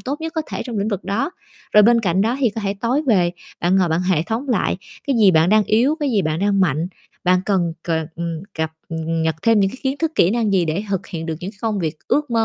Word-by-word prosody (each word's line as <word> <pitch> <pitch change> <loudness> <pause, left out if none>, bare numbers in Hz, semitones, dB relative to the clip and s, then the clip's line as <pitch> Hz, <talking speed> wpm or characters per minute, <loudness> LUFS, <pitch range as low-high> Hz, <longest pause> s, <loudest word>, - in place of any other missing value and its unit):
tốt 285 +4 -4
nhất 325 0 -4
có 320 - 0
thể - - -3
trong 235 -5 -4
lĩnh 200 - 0
vực 200 -4 -3
đó. 225 - -1 0.4
Rồi 210 - +7
bên 235 +2 +5
cạnh 185 -3 +1
đó 230 +5 +1
thì 245 - +3
có 225 - -5
thể 200 -1 -2
tối 250 +6 +1
về, 185 -7 +3 0.3
bạn 180 +2 +2
ngồi 185 -2 +3
bạn 160 +1 +1
hệ 180 -4 +1
thống 230 +8 -3
lại 220 -5 +1 0.3
cái 275 - +1
gì 210 -4 +6
bạn 160 0 +4
đang 215 0 +4
yếu, 245 +10 +2
cái 290 -2 0
gì 210 -5 +2
bạn 155 -1 -1
đang 200 -1 +2
mạnh, 165 -3 +1 0.4
bạn 180 0 +4
cần 180 -5 +1 0.2
c - - 0
ờ, 160 -1 0 0.5
cập, 160 0 0 0.2
ừm, 165 0 -2
nhật 160 0 +1
thêm 225 -2 +4
những 195 -1 +2
cái - - -9
kiến 270 +1 -1
thức 325 -1 -1
kỹ 170 - +4
năng 225 -2 +1
gì 185 -3 +3
để 165 +5 -1
thực 195 -1 -2
hiện 165 -3 -6
được 160 - -2
những 185 - -5
cái 205 - -23
công 215 -3 0
việc 160 -3 -2
ước 295 -2 +1
mơ 225 -1 +2
200 Hz, 280 wpm, -20 LUFS, 175-230 Hz, 0.5 s, Rồi